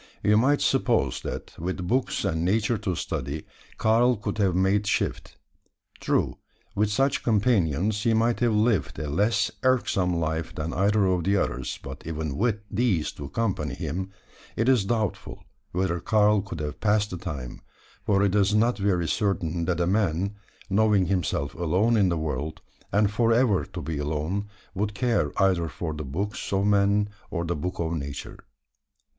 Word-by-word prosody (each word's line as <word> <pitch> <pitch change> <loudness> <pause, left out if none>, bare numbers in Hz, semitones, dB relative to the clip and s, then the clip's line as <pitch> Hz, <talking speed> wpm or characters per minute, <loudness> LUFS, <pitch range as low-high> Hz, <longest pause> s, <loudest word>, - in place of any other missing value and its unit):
You 105 - +4
might 135 +6 +3
suppose 115 - +1
that, - - -6
with 90 +1 -3
books 125 -1 0
and 80 -4 0
Nature 105 +4 +1
to 95 -5 -2
study, 75 -1 -4 0.3
Karl 120 +2 +3
could 105 +1 -4
have 95 -4 +2
made 95 +2 +2
shift. - - -1 0.6
True, - - 0 0.3
with 105 0 +1
such 135 +6 +1
companions 105 - +1
he 115 0 +2
might 115 +1 +2
have 120 -3 +2
lived 105 - +1
a 75 - -3
less 105 +6 +2
irksome 100 -9 +2
life 80 0 -2
than 80 +2 -3
either 100 +3 +2
of 90 -3 +1
the 100 +1 +3
others; 65 -7 -2
but 65 0 -8
even 80 -3 -3
with 110 -1 0
these 100 -8 +1
to 70 - -8
occupy 95 -3 -2
him, 90 +3 -4 0.5
it 115 - 0
is 125 -7 +4
doubtful 110 -3 -2 0.3
whether 90 -1 0
Karl 105 -1 +3
could 90 -5 -6
have 75 0 -5
passed 105 -1 +2
the 90 - -4
time; 70 -9 -6 0.4
for 100 -1 +2
it 100 -2 +2
is 105 0 +3
not 115 +2 +2
very 90 -4 +1
certain, 85 -5 0
that 90 -1 0
a 85 - +2
man 95 0 +1 0.3
knowing 105 -1 +3
himself 85 -6 -1
alone 90 +8 +1
in 100 -4 +4
the 85 - 0
world, 80 0 -3 0.3
and 105 0 +3
for 115 +2 +2
ever 115 -5 +3
to - - -7
be 80 -3 -3
alone 80 +7 -2 0.3
would 105 +1 -2
care 115 - +1
either 95 -4 +3
for 80 +1 -4
the 75 0 -5
books 95 +10 -4
of 100 0 +1
men 100 0 +3 0.2
or 85 -2 -2
the 85 - -1
book 90 +5 -4
of 85 -1 -1
Nature. 70 -3 -6
95 Hz, 170 wpm, -26 LUFS, 85-105 Hz, 0.6 s, You